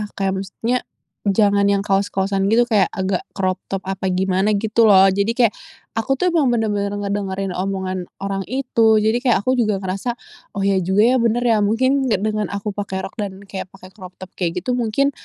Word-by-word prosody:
kayak 195 -1 0
maksudnya 225 +6 -2 0.5
jangan 200 0 +3
yang 200 -1 +1
kaos-kaosan 195 0 0
gitu 225 +4 +4
kayak 215 -5 +3
agak 190 -1 -1 0.2
crop 185 -1 -1
top 195 -1 -4
apa 190 0 -3
gimana," 190 +2 +1
gitu 220 +2 +2
loh. 195 -1 +7
Jadi 200 +4 0
kayak 235 -4 +3 0.5
aku 270 +4 0
tuh 360 +6 +1
emang 315 -5 +2
bener-bener 210 -4 0
ngedengerin 200 -1 -3
omongan 185 -1 -3 0.2
orang 195 0 -2
itu, 230 -5 +2
jadi 220 +3 +2
kayak 245 -2 +2
aku 255 - +1
juga 210 -4 0
ngerasa, 195 +6 -3 0.4
"Oh 200 - -1
iya 195 -1 +2
juga 190 +3 +2
ya, 245 +3 +4
bener 235 +1 +1
ya 230 -3 +3
mungkin 260 +6 +2
ya 225 - +2
dengan 215 -1 -1
aku 200 +1 -4
pakai 195 -2 -4
rok 190 - -8
dan 200 -1 -5
kayak 195 -1 -7
pakai 185 0 -15
crop 185 -3 -12
top 185 -1 -11
kayak 180 0 -2
gitu 250 - -1
mungkin, 245 +5 +1
200 Hz, 195 wpm, -20 LUFS, 190-225 Hz, 0.5 s, loh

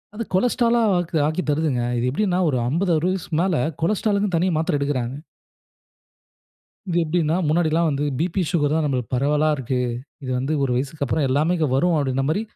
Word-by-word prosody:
அது 230 - -3
கொலஸ்டரால் 235 +3 +2
லா - - +3 0.2
ஆக்கு 175 -2 -2
ஆக்கித் 155 +1 -2
தருதுங்க. 145 -4 0 0.2
இது 120 +1 0
எப்பிடின்னா 185 +5 0
ஒரு 130 - 0
50 175 +6 0
60 180 +4 0
வயசு 175 - -11
மேல 185 -1 +1 0.3
கொலஸ்டரால் 205 +3 +1
க்குன்னு 200 -3 0
தனியா 180 +1 +1
மாத்திரை 160 -1 0
எடுக்குறாங்க. 135 -3 -2 1.7
இது 175 - -1
எப்பிடின்னா, 165 0 0
முன்னாடி 160 +2 +2
எல்லாம் 165 +2 +2
வந்து 140 0 -1
P - - +1
P, 190 - 0
Sugar 155 -5 +1
தான் 160 +1 +1
நம்மளுக்கு 130 -5 -2
பரவலா 150 +4 +2
இருக்கு. 130 -1 -2 0.4
இது 130 - -5
வந்து 135 +4 -2
ஒரு 135 -2 0
வயசுக்கு 140 +3 -2
அப்புறம் 140 +2 0
எல்லாமே 150 +7 +2 0.2
வரும் 175 +6 +2
அப்பிடின்னமாரி 135 +6 0
155 Hz, 180 wpm, -22 LUFS, 140-180 Hz, 1.7 s, லா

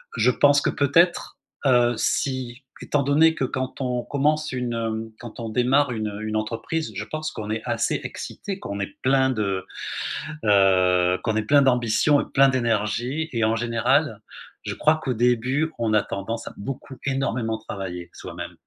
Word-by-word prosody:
Je - - +4
pense 145 +3 +4
que - - +1
peut-être, 165 +5 +2 0.3
heu, 120 -2 +4
si, 130 0 -1 0.2
étant 145 -1 0
donné 160 +4 +4
que 135 - -2
quand 130 +1 -3
on 125 -2 -1
commence 150 +1 0
une, 125 -2 -2
hem, 110 -1 -3
quand 120 0 -9
on 115 - -4
démarre 125 +4 +2
une, 110 -2 -2
heu, 105 0 -6
une 110 0 -2
entreprise, 115 +9 -3
je - - -3
pense 155 0 -4
qu'on 105 -1 -6
est 110 0 -2
assez - - 0
excité 195 -2 -6
qu'on 100 - -6
est 100 - -4
plein 130 0 +3
de, 100 -6 -1 0.8
heu, 95 -3 +4
qu'on 110 -2 0
est 110 - +1
plein 140 +6 +5
d'ambition 130 +3 +3
et - - -5
plein 135 0 +6
d'énergie 120 +4 0
et 115 - 0
en 110 +1 +2
général, 120 +6 +1 0.4
je - - -4
crois 155 +1 +3
qu'au 130 - 0
début, 125 +7 +1
on 115 -2 0
a 105 - +4
tendance 115 +4 -5
à - - -7
beaucoup 130 +4 -7
énormément 125 -4 -1
travailler 95 -5 -7
soi-même, - - -8
120 Hz, 175 wpm, -24 LUFS, 110-140 Hz, 0.8 s, plein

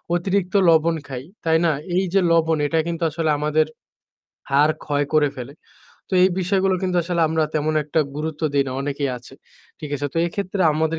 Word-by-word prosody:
অতিরিক্ত 185 +1 -1 0.2
লবণ 165 +1 +4
খাই, 130 -1 -6 0.2
তাই 160 0 +4
না? 165 - +3 0.2
এই 190 - +2
যে 195 - +5
লবণ, 165 -1 +3
এটা 160 +2 +1
কিন্তু 170 0 -3
আসলে 160 +1 -2
আমাদের 150 +1 +2 0.9
হাড় 145 +3 +4
ক্ষয় 145 -1 0
করে 150 -1 +4
ফেলে। 125 +2 -7 0.6
তো - - -18
এই 185 - +6
বিষয়গুলো 190 +1 +1
কিন্তু 185 -1 0
আসলে 170 0 -1
আমরা 160 0 +1
তেমন 155 +1 0
একটা 150 +2 +1 0.2
গুরুত্ব 155 +1 -4
দেই 140 -1 +2
না, - - -4
অনেকেই 140 -1 -2
আছে, 125 +2 -15 0.5
ঠিক 150 -2 -7
আছে। 145 +1 -3
তো - - -9
এইক্ষেত্রে 190 +2 -3
আমাদের 160 +1 0
160 Hz, 185 wpm, -22 LUFS, 145-170 Hz, 0.9 s, এই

